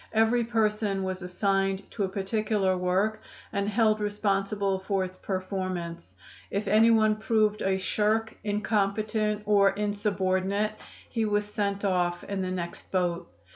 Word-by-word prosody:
Every 225 +2 +3
person 215 -3 0
was 190 0 -3
assigned 195 +1 0
to 210 - -2
a - - -4
particular 200 0 0
work 190 +4 0 0.3
and 200 0 0
held 215 0 +3
responsible 200 -1 0
for 190 0 0
its 185 0 -7
performance. 185 - -4 0.3
If 200 +2 -2
anyone 215 0 +5
proved 215 -1 +1
a 190 0 +1
shirk, 215 +3 0
incompetent 210 0 0
or 200 -1 +5
insubordinate, 200 0 0 0.4
he 225 - -1
was 210 0 +1
sent 205 -1 -2
off 175 -2 +1
in 200 -1 -3
the 185 - -2
next 175 -2 -5
boat. 175 -2 -1
200 Hz, 135 wpm, -28 LUFS, 190-215 Hz, 0.4 s, anyone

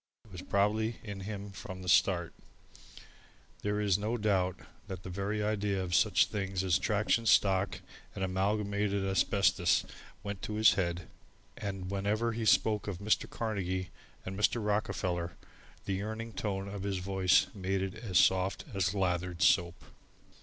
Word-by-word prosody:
It 110 - -19
was 90 -1 -7
probably 110 +4 +1
in 100 -3 -6
him 100 0 -6
from 95 0 -8
the - - -8
start. 90 -2 +3 1.3
There 105 0 -1
is 100 -2 +2
no 110 +4 -1
doubt 95 -4 +1 0.3
that 95 -3 -7
the 90 - -6
very 100 +3 -2
idea 105 -2 0
of 90 -1 -4
such - - +4
things 95 -2 -3
as 90 -3 +2
Traction 110 +2 +1
Stock 95 -2 +3 0.3
and 95 - -3
Amalgamated 100 +1 0
Asbestos 95 0 +2 0.4
went 100 -2 -5
to 105 - -4
his 110 0 +6
head: 85 -2 -2 0.5
and 95 -2 -5
whenever 105 +4 0
he 115 0 -3
spoke 105 -1 +3
of 100 -4 -3
Mr. 105 +3 0
Carnegie 95 -5 -3 0.3
and 95 - -5
Mr. 105 +4 +2
Rockefeller, 90 -4 -1 0.5
the 100 - -1
yearning 110 +3 -5
tone 100 -2 -3
of 100 -1 -6
his 100 -1 -2
voice 95 0 +3
made 95 -1 -1
it 95 -1 -3
as 110 -5 -2
soft 95 +1 +3
as 95 0 0
lathered 90 -1 0
soap. 90 -2 +2
100 Hz, 155 wpm, -31 LUFS, 95-105 Hz, 1.3 s, his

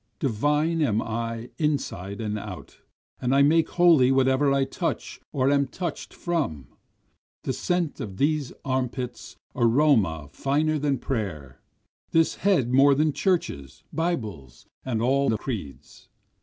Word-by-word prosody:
Divine 150 +7 +1
am 110 -8 +2
I 115 +1 -4
inside 120 - -2
and 105 -1 -2
out, 100 -4 -9 0.4
and 125 +2 +1
I 140 - +6
make 160 +3 +3
holy 165 -8 +5
whatever 135 +1 +3
I 135 0 +3
touch 135 - -4
or 135 0 +2
am 140 -1 +2
touch'd 170 +4 -5
from, 140 - -3 0.7
The - - -1
scent 175 -4 -1
of 95 -3 -6
these 145 -2 0
arm 130 -2 0
pits 125 0 -7 0.2
aroma 115 - +3
finer 150 - 0
than 140 -1 0
prayer, 85 - -4 0.5
This 165 -1 +2
head 155 -11 +2
more 140 +1 +6
than 150 +1 +2
churches, 80 - -2
bibles, 105 - -3 0.2
and 115 -4 -1
all 140 +3 +2
the 110 - +1
creeds. 75 - -7
130 Hz, 135 wpm, -25 LUFS, 110-150 Hz, 0.7 s, I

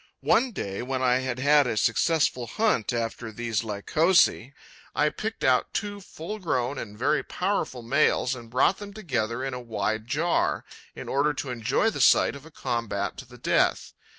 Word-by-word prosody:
One 240 +3 +3
day, 100 - -4
when 130 +1 -2
I 125 -1 +4
had 130 -1 -3
had 145 +1 +4
a 110 - -2
successful 130 +1 +1
hunt 210 - +1
after 115 -1 -3
these 115 0 -2
Lycosae, 130 - +2 0.4
I 150 +2 +3
picked 220 +7 -5
out 130 -1 +2
two 205 -1 -3
full 190 +3 -7
grown 130 -7 -1
and 105 -1 -8
very 145 +6 +1
powerful 180 -10 -2
males 130 0 +2
and 120 -3 -9
brought 130 +10 +2
them 205 -1 -9
together 130 - -2
in 135 -1 -3
a 125 - -4
wide 110 -1 -2
jar, 155 +6 0 0.3
in - - -8
order 145 +2 +1
to 135 -1 -4
enjoy 125 - +1
the - - -3
sight - - +5
of 140 +2 -11
a - - -13
combat 115 -9 -3
to 135 - -8
the 125 0 -14
death. 120 - +1
130 Hz, 180 wpm, -26 LUFS, 115-160 Hz, 0.4 s, sight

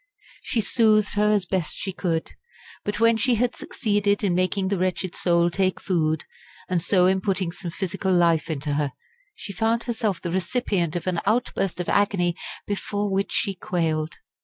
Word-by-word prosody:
She 230 - 0
soothed 215 -1 +3
her 210 +1 +3
as 205 -3 +2
best 180 -3 -1
she 190 - -4
could, 165 -4 -2 0.5
but 205 0 -2
when 230 0 +5
she 245 +2 +2
had 245 +2 0
succeeded 205 -3 0
in 195 -3 +2
making 185 +2 +1
the 195 -2 0
wretched 185 0 -1
soul 170 -1 +2
take 185 +1 0
food, 160 -4 0 0.4
and 180 -2 0
so 180 +1 +3
in 190 +1 +3
putting 185 -3 0
some 175 0 -6
physical 190 +2 -2
life 170 -3 +3
into 150 -1 -2
her, 145 -2 -1 0.4
she 200 - -7
found 225 +4 +1
herself 220 -6 -1
the 170 - -4
recipient 185 -3 0
of 175 - -3
an 180 -2 0
outburst 210 -5 0
of 180 - -3
agony 190 -4 +2 0.3
before 205 0 -2
which 195 +1 0
she 200 - 0
quailed. 165 -4 -1
190 Hz, 175 wpm, -24 LUFS, 175-205 Hz, 0.5 s, when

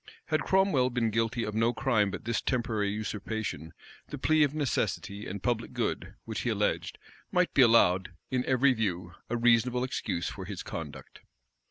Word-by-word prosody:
Had - - +2
Cromwell 190 -10 +3
been 120 -3 0
guilty 115 +2 0
of 105 - -3
no 115 +2 +2
crime 110 -7 +2
but - - -7
this 115 -1 0
temporary 115 -5 0
usurpation, 105 -5 -4 0.4
the - - -6
plea 155 0 +3
of 145 0 +3
necessity 105 -7 -2
and 95 0 -6
public 120 -2 -1
good, - - -2
which - - -4
he - - -1
alleged, - - -1 0.3
might 180 0 +2
be 140 - +5
allowed, 95 -6 +5 0.2
in 130 -1 +1
every 130 +1 +4
view, 90 -6 -2 0.2
a 120 - 0
reasonable 120 +1 +3
excuse 90 -8 -2
for 95 - -6
his 95 -1 -6
conduct. - - -8
115 Hz, 170 wpm, -29 LUFS, 105-125 Hz, 0.4 s, be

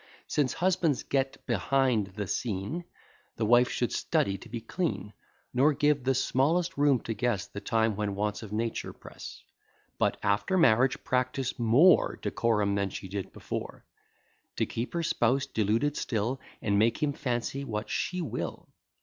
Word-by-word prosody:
Since 145 -4 0
husbands 175 -6 +1
get 135 -1 -1
behind 120 0 +1
the 105 -1 -3
scene, 110 - -3 0.5
The 110 - -1
wife 120 +3 +5
should - - -1
study 100 -1 0
to 120 - -12
be 115 +1 -4
clean; 115 - -3 0.4
Nor 140 +5 +4
give 145 -1 +2
the 135 +1 +2
smallest 165 +8 +1
room 140 -3 +3
to 115 - -3
guess 105 -2 -1
The 100 - -8
time 110 0 +1
when 105 -1 -2
wants 105 +1 -2
of 110 -3 -9
nature 115 +1 -2
press; - - -11 0.6
But - - +2
after 100 - +1
marriage 130 -5 +4
practise 130 0 -1
more 130 +10 +5
Decorum 105 -4 +1
than 100 -1 0
she 95 - -7
did 100 0 -4
before; - - -6 0.7
To - - +1
keep 115 +2 -4
her 170 - 0
spouse 130 -1 +2
deluded 115 +3 0
still, 120 +3 -2 0.2
And 100 -1 +2
make 115 +7 +2
him 145 -1 +1
fancy 130 0 -2
what 110 -4 -4
she 180 -1 -2
will. 155 - -5
120 Hz, 160 wpm, -29 LUFS, 105-140 Hz, 0.7 s, wife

